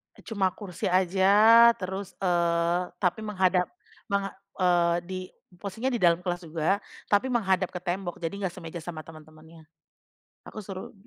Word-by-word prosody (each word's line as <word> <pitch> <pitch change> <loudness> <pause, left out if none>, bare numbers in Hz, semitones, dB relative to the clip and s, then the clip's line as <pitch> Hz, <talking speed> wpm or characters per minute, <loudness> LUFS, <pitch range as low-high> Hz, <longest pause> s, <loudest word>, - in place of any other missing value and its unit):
Eee, - - -16
cuma 195 -5 0
kursi 185 -4 -7
aja, 200 +6 +6
terus, 195 -2 -6
eee, 170 -1 +2 0.2
tapi 180 +2 +1
menghadap 185 -3 +2 0.4
menga 200 0 -1 0.3
eee, 175 -2 +3
di 185 0 -3 0.4
posisinya 210 +7 -3
di 245 - -1
dalam 170 0 +4
kelas 175 -1 -3
juga, 165 +4 0 0.3
tapi 210 +6 +2
menghadap 190 -6 +1
ke 180 - -4
tembok. 175 0 -3
Jadi 170 +4 -3
nggak 175 - -3
semeja 170 -1 -8
sama 160 -1 -7
temen-temennya. 155 +1 -15 0.8
Aku - - -14
suruh 190 -2 -8
185 Hz, 145 wpm, -27 LUFS, 170-200 Hz, 0.8 s, aja